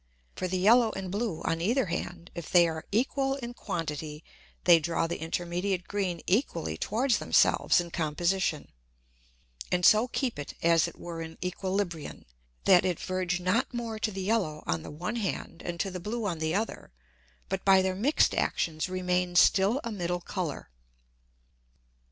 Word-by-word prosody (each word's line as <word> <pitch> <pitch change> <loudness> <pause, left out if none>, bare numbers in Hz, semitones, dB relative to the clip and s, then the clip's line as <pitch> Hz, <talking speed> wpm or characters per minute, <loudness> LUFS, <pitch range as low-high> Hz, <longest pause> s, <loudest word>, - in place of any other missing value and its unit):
For 185 - -2
the 185 +1 -1
yellow 225 +5 +5
and 190 -2 -5
blue 200 -6 -2
on 165 0 -1
either 235 +8 +2
hand, 175 0 -5
if 170 -3 -7
they 175 -1 +6
are 160 0 -5
equal 270 +5 +1
in 240 -3 -6
quantity 155 -6 -5 0.4
they 175 -2 +7
draw 165 +1 0
the 165 0 -4
intermediate 175 +3 -2
green 190 -4 -2
equally 180 - 0
towards 235 - +1
themselves - - +3
in 170 -1 -4
Composition, 170 +1 -1 1.0
and 180 0 +2
so 220 +3 +6
keep 250 - -2
it 145 - -6
as 165 -1 +4
it - - -10
were 170 -1 -6
in 160 0 -8
Æquilibrion, 180 -3 -3 0.4
that 185 -3 +6
it 180 -3 -1
verge 185 -1 -1
not 185 +8 +1
more 230 -2 -4
to 215 - 0
the 195 -2 -5
yellow 185 -8 0
on 85 -1 -1
the - - -9
one 175 +10 -4
hand, 195 -5 -4
and 170 -1 -5
to 195 - -1
the 180 - -5
blue 215 +5 -3
on 170 -5 -2
the 160 +2 -1
other, 220 +3 -3 0.6
but 190 0 -3
by 190 -1 +6
their 190 0 0
mix'd 240 +11 +2
Actions 155 +1 -1
remain 180 -1 -1
still 195 +7 +5
a 235 - -4
middle 175 -3 -2
Colour. 170 - -4
180 Hz, 170 wpm, -29 LUFS, 170-205 Hz, 1.0 s, they